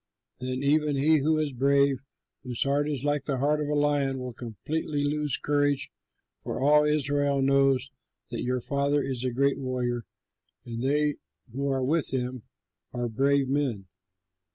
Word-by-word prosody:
Then 130 +1 -3
even 150 +1 +2
he 155 +3 +4
who 155 +3 +2
is 150 -3 -1
brave, 140 +1 +3 0.4
whose 125 -3 -2
heart 145 +2 +1
is 140 -2 -2
like 145 -1 0
the 140 -3 -1
heart 150 +3 +1
of 150 - -2
a 150 - 0
lion, 145 -2 +1
will 125 -1 -5
completely 145 - -3
lose 150 -2 -1
courage; 145 -1 0 0.5
for - - -4
all 150 +2 +5
Israel 145 -2 +1
knows 135 -1 +3 0.4
that - - -3
your 125 0 -1
father 140 +2 0
is 130 -2 -3
a 130 - +1
great 140 +3 +1
warrior, 125 -3 -2 0.6
and 115 -1 -5
they 150 +2 +1 0.4
who 140 +2 -1
are 135 -1 0
with 155 +3 +2
him 125 -1 -2 0.5
are 120 -1 -2
brave 140 +4 +2
men. 130 -8 -1
140 Hz, 160 wpm, -27 LUFS, 130-145 Hz, 0.6 s, all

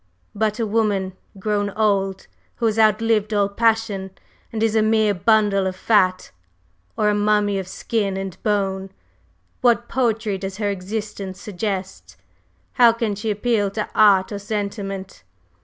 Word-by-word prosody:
But 215 +1 -1
a 230 - +1
woman 205 -3 0 0.2
grown 205 +1 -1
old, 195 -2 0 0.3
who 235 - -2
has 225 0 +1
outlived 215 0 +2
all 200 -1 +3
passion 215 -2 0 0.4
and 225 -1 -2
is 225 -1 +2
a 220 - +4
mere 215 -1 +3
bundle 200 0 +2
of 185 - -3
fat, 185 -2 +2 0.7
or 210 - +2
a - - +2
mummy 205 -1 +2
of 190 - -6
skin 200 0 -2
and 195 -2 -5
bone, 195 -2 -1 0.7
what 240 -1 +3
poetry 225 -5 0
does 195 0 -5
her 205 -2 0
existence 200 0 -5
suggest? 195 -1 -5 0.6
How 240 -3 +6
can 230 -2 -1
she 210 +2 -4
appeal 210 -1 +1
to 210 +2 -3
art 200 -3 +5
or 205 - -4
sentiment? 200 - -5
205 Hz, 145 wpm, -21 LUFS, 195-220 Hz, 0.7 s, How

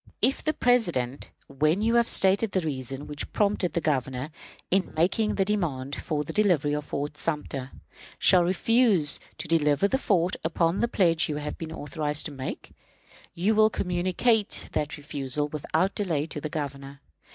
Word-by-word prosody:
"If 260 +4 +1
the 310 - 0
President, 175 - 0 0.2
when 155 +8 +1
you 230 +1 +2
have 235 0 +4
stated 195 +2 +3
the 185 - +1
reasons 135 -2 -4
which 145 -1 -6
prompt 200 -4 +1
the - - -1
Governor 135 -2 -2 0.4
in 190 0 0
making 210 +6 +1
the 195 - +1
demand 145 -10 -2
for 150 -2 -3
the - - -7
delivery 175 -9 +2
of 150 0 -4 0.2
Sumter, 150 -4 -3 0.5
shall 180 -2 +5
refuse 190 -3 +4 0.2
to - - -5
deliver 150 +1 +2
the 265 +6 0
fort 185 -7 +1
upon 165 +2 +1
the 235 - +2
pledge 170 -9 +2
you 150 - -2
have 150 0 -4
been 160 -1 -6
authorized 150 -1 -2
to 150 - -5
make, 135 -2 -7 0.6
you 190 +6 +1
will 215 0 +5
communicate 185 +4 0
that 150 -1 -2
refusal 145 0 -3
without 160 +5 -1
delay 165 -8 -1
to 155 -2 -7
the 155 - -4
Governor. 140 -2 -6
160 Hz, 165 wpm, -26 LUFS, 145-195 Hz, 0.6 s, shall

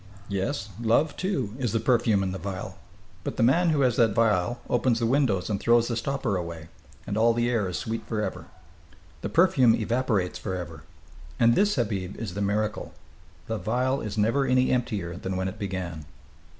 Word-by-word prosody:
"Yes, 95 +1 -2
love, 120 +7 +2
too, 140 - -2
is 120 -6 -1
the 115 - +2
perfume 115 -4 +2
in 95 - -2
the 95 - -5
vial. 95 -2 -6 0.4
But - - -4
the - - +2
man 165 +9 +4
who 150 -3 +2
has 125 -3 +2
that 115 -4 +3
vial 115 0 +2
opens 120 -1 +2
the 115 - 0
windows 115 -7 +1
and 100 -2 -1
throws 120 0 +3
the 115 - -1
stopper 125 -2 -1
away, 85 -2 -6 0.4
and 100 - -3
all 115 +1 +4
the 120 0 +1
air 105 -6 0
is 90 - -3
sweet 115 0 -4
forever. 105 -2 -3 0.7
The - - -3
perfume 140 -10 +4
evaporates, 110 -5 0
forever. 90 -5 -5 0.6
And 115 0 +5
this, 205 - +3
Habib, 100 -7 -2
is 110 -7 -5
the 100 - -4
miracle. 105 +2 -1 0.5
The 110 -1 -3
vial 130 +4 0
is 105 -1 -5
never 115 +6 +2
any 130 0 +3
emptier 105 -9 -1
than 95 0 -4
when 95 0 -1
it 95 +3 -6
began." 90 -6 -4
110 Hz, 185 wpm, -26 LUFS, 95-125 Hz, 0.7 s, And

